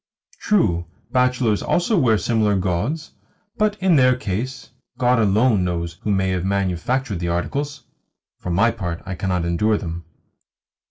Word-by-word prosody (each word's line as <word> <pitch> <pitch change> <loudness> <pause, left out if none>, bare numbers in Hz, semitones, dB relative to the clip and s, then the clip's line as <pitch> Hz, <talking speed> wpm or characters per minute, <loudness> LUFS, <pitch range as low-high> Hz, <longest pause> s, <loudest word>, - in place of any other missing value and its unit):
True, 85 - +1 0.2
bachelors 125 -4 +2
also 180 +5 +1
wear 120 - +3
similar 110 -2 +1
gauds, 100 - -2 0.5
but, 210 -1 +1
in 185 -4 +3
their 130 -1 +5
case, 125 +4 -4 0.3
God 125 -1 +3
alone 105 0 +3
knows 85 -1 -3
who - - -3
may 95 -1 +1
have 90 -1 -1
manufactured 100 +4 -1
the 85 - -2
articles! 140 +11 -3 0.6
For - - -6
my 105 +7 +3
part, 90 -7 -5
I 95 - -4
cannot 90 -2 -1
endure 105 +6 +1
them. 85 -3 -6
105 Hz, 145 wpm, -21 LUFS, 90-130 Hz, 0.6 s, their